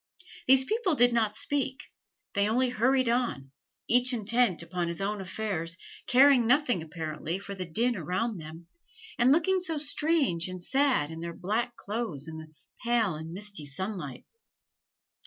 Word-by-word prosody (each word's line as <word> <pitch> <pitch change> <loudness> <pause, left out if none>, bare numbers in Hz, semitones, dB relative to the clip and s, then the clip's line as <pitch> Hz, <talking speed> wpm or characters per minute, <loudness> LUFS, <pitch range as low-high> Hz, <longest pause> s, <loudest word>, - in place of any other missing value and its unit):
These 265 0 +7
people 415 - 0
did 245 -2 +4
not 220 -3 +1
speak: 270 +1 -1 0.5
they 200 +1 +2
only 250 +3 +2
hurried 255 +2 +2
on, 230 - -1 0.4
each 250 +2 +5
intent 230 -5 +1
upon 175 0 -3
his 170 -1 -3
own 200 +1 -2
affairs, 175 -3 -3 0.3
caring 255 -2 +6
nothing, 250 - +3
apparently, 160 +1 -4
for 200 0 -7
the 185 -2 -6
din 235 +8 +1
around 185 +4 -2
them, 160 +2 -10 0.5
and 250 +2 +5
looking 345 +5 +3
so 335 -3 -4
strange 290 - +1
and 185 -1 -7
sad 265 - +2
in 160 - -7
their 170 0 -6
black 230 +6 -2
clothes 200 - -4
in 160 0 -7
the 155 0 -12 0.3
pale 235 -5 +2
and 160 +1 -7
misty 200 -4 -6
sunlight. 170 -3 -6
215 Hz, 155 wpm, -28 LUFS, 170-250 Hz, 0.5 s, These